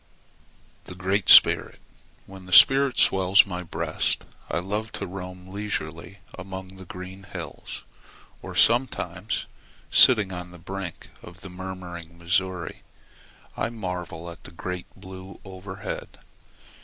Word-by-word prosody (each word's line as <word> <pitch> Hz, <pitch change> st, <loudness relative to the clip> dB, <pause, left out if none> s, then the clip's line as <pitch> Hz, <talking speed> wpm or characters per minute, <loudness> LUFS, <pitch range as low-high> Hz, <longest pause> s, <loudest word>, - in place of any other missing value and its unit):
THE 90 Hz, -, -9 dB
GREAT 95 Hz, +2 st, -1 dB
SPIRIT -, -, +7 dB, 0.5 s
When 95 Hz, -1 st, -12 dB
the 90 Hz, -, -5 dB
spirit 135 Hz, +3 st, +7 dB
swells 95 Hz, 0 st, +5 dB
my 90 Hz, -3 st, -5 dB
breast 85 Hz, -, -1 dB, 0.2 s
I -, -, -1 dB
love 105 Hz, +5 st, -3 dB
to 100 Hz, -, -4 dB
roam 90 Hz, 0 st, -8 dB
leisurely 100 Hz, -3 st, -4 dB, 0.2 s
among 95 Hz, 0 st, -8 dB
the 95 Hz, -, -11 dB
green 90 Hz, +2 st, -9 dB
hills; 95 Hz, -, -8 dB, 0.6 s
or -, -, -8 dB
sometimes, 110 Hz, -6 st, +2 dB, 0.5 s
sitting 105 Hz, -7 st, +6 dB
on 90 Hz, 0 st, -6 dB
the 90 Hz, -, -13 dB
brink 95 Hz, 0 st, -7 dB
of 85 Hz, +3 st, -13 dB
the 95 Hz, -, -9 dB
murmuring 90 Hz, -2 st, -8 dB
Missouri, 85 Hz, 0 st, -1 dB, 0.7 s
I -, -, -1 dB
marvel 90 Hz, -6 st, -5 dB
at 85 Hz, -, -13 dB
the -, -, -11 dB
great 90 Hz, +1 st, -6 dB
blue 95 Hz, 0 st, -11 dB
overhead. 95 Hz, 0 st, -7 dB
95 Hz, 125 wpm, -25 LUFS, 90-95 Hz, 0.7 s, SPIRIT